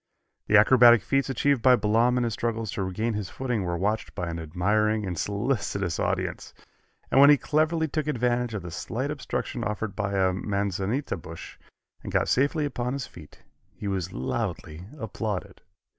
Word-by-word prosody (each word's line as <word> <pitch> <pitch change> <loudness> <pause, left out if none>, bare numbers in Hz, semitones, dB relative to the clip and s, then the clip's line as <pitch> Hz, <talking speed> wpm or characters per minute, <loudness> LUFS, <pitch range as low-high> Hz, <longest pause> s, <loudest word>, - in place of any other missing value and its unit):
The 110 - +6
acrobatic 120 0 +7
feats 135 0 0
achieved 135 +1 +1
by 130 +1 +6
Balaam 115 +3 +2
in 125 - +1
his 115 -2 -1
struggles 115 -2 -2
to - - -3
regain 110 +5 -2
his 105 -3 -4
footing 125 -6 -2
were 85 -1 -2
watched 105 +5 -2
by 90 -3 -3
an 85 - -5
admiring 105 +6 0
and 90 -2 -3
solicitous 100 -4 -2
audience, - - -2 0.6
and 135 - +6
when 140 - +9
he 145 - +7
cleverly 160 +3 +1
took 155 0 -3
advantage 125 -3 0
of 100 - -4
the 85 - -7
slight 130 - -3
obstruction 130 -4 -4
offered 105 0 -3
by 100 -1 -2
a 95 -1 +2
manzanita 100 +5 -2
bush, 85 0 -10 0.4
and - - -7
got - - +1
safely 145 +4 +2
upon 125 -3 -3
his 140 -2 -3
feet, 80 -4 -15 0.3
he 105 - -6
was 95 -2 -2
loudly 75 +6 -4
applauded. 105 -5 -4
110 Hz, 175 wpm, -26 LUFS, 95-125 Hz, 0.6 s, when